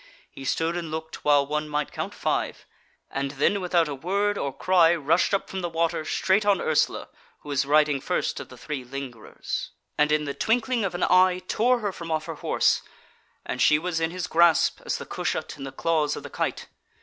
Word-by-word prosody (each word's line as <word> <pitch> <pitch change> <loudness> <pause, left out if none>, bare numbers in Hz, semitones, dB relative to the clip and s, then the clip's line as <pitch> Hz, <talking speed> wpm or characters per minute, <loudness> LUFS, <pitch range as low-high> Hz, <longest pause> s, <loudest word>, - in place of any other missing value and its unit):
He 135 - -10
stood 165 +4 0
and 170 -2 -4
looked 160 0 -6
while 145 -1 +4
one 150 +1 -2
might 150 -1 -2
count - - -5
five, - - -2 0.5
and 135 0 -2
then 190 +8 +1
without 175 -2 +2
a 145 - -3
word 200 +8 0
or 140 -8 -2
cry 175 +2 +4
rushed 165 +2 +2
up 200 - 0
from 190 - -5
the 175 - -2
water, 165 -1 0
straight 190 +6 +2
on 205 -2 +3
Ursula, 155 - +1 0.3
who 150 - -11
was 140 -1 0
riding 150 -1 +3
first - - -1
of - - -8
the - - -12
three 145 -4 -5
lingerers, 125 -3 -6 0.3
and 150 0 +4
in 150 0 +2
the 140 - -3
twinkling 230 - +1
of 190 -3 -2
an 175 - -1
eye 185 0 +4
tore 245 +2 +2
her 205 -2 -1
from 170 -2 -8
off 155 -1 -1
her - - -5
horse; - - +1 0.6
and - - -3
she 150 - +6
was 170 +1 -2
in 160 0 0
his 180 +1 -4
grasp 170 0 +3
as - - 0
the - - -7
cushat - - -3
in 135 - -6
the 135 - -6
claws 155 -2 0
of - - -7
the - - -9
kite. - - -2
160 Hz, 210 wpm, -25 LUFS, 150-185 Hz, 0.6 s, she